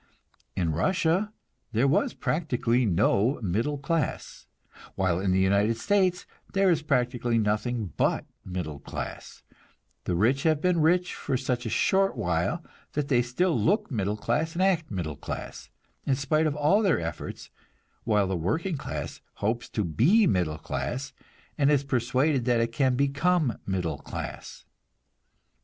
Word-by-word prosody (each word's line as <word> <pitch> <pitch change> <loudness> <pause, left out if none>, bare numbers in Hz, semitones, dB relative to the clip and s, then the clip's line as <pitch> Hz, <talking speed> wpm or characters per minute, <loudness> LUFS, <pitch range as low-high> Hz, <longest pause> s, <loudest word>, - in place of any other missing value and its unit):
In 85 -3 0
Russia 175 - +1 0.4
there 120 +5 +3
was 140 - +1
practically 125 -6 0
no 100 - +2
middle 115 +10 0
class, 150 +3 -3 0.5
while 90 -2 +1
in 95 0 0
the 95 - +3
United 100 +4 +2
States 185 - +1 0.3
there 195 -1 +4
is 165 -2 +1
practically 125 -5 0
nothing 110 - -1
but - - +1 0.2
middle 90 -6 -5
class; - - -7 0.6
the 90 - 0
rich 120 +9 +2
have 155 -1 +2
been 175 0 +2
rich 175 +3 +2
for 130 - -2
such 125 -2 -2
a - - -2
short 195 - +2
while 85 -1 -1 0.3
that 145 -1 -2
they 125 -4 +4
still 140 +9 0
look 210 +2 +1
middle 105 -3 -1
class 140 +10 -1
and 185 +2 0
act 175 -5 +2
middle 85 -7 -3
class, - - -7 0.4
in 135 - +3
spite 155 +4 +1
of 150 - -1
all 150 +8 +3
their 195 -6 +2
efforts, 80 -1 -6 0.5
while 105 -3 +2
the 95 0 -1
working 145 - -1
class - - -6
hopes 115 +3 -2
to 105 - -1
be 145 - +4
middle 90 - +1
class 130 - -4 0.5
and 140 0 +4
is 145 -2 +3
persuaded 130 +1 +1
that 120 -2 +3
it 115 0 0
can 130 +2 +2
become 140 +1 +1
middle 90 -6 -2
class. - - -7
125 Hz, 150 wpm, -27 LUFS, 100-160 Hz, 0.6 s, there